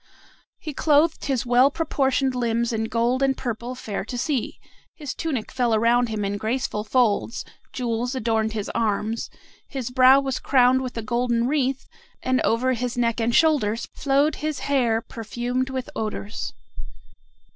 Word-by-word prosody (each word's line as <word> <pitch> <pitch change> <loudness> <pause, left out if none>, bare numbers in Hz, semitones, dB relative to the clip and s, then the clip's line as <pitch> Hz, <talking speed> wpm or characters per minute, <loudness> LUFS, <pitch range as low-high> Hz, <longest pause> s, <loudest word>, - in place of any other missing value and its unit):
He 305 - -7
clothed 305 +3 +2
his 265 -4 -1
well 245 +3 +5
proportioned 270 -4 0
limbs 235 -1 0
in 220 0 -1
gold 235 +3 0
and 270 -1 +2
purple 240 0 -4
fair 210 -6 -4
to 245 - -5
see, 265 -1 -2 0.4
his 290 -5 -5
tunic 270 -9 -3
fell 240 -3 +1
around 235 +2 +3
him 215 -2 -2
in 200 +1 -2
graceful 220 -1 -2
folds, 230 0 +1 0.3
jewels 245 0 -2
adorned 220 -2 0
his 210 -2 -3
arms, 220 +1 -1 0.4
his 255 -3 -5
brow 260 +1 +7
was 270 -2 -2
crowned 260 -1 +4
with 255 -2 -5
a 230 - -3
golden 235 +1 0
wreath, 270 -2 0 0.4
and 255 0 +1
over 255 +3 +2
his 245 +1 -3
neck 230 -1 +1
and 235 +1 +1
shoulders 235 -9 +2
flowed 280 +2 +1
his 305 -1 -3
hair 240 -5 +1
perfumed 240 +4 -3
with 260 -1 -4
odors. 215 -1 -4
245 Hz, 155 wpm, -24 LUFS, 230-265 Hz, 0.4 s, brow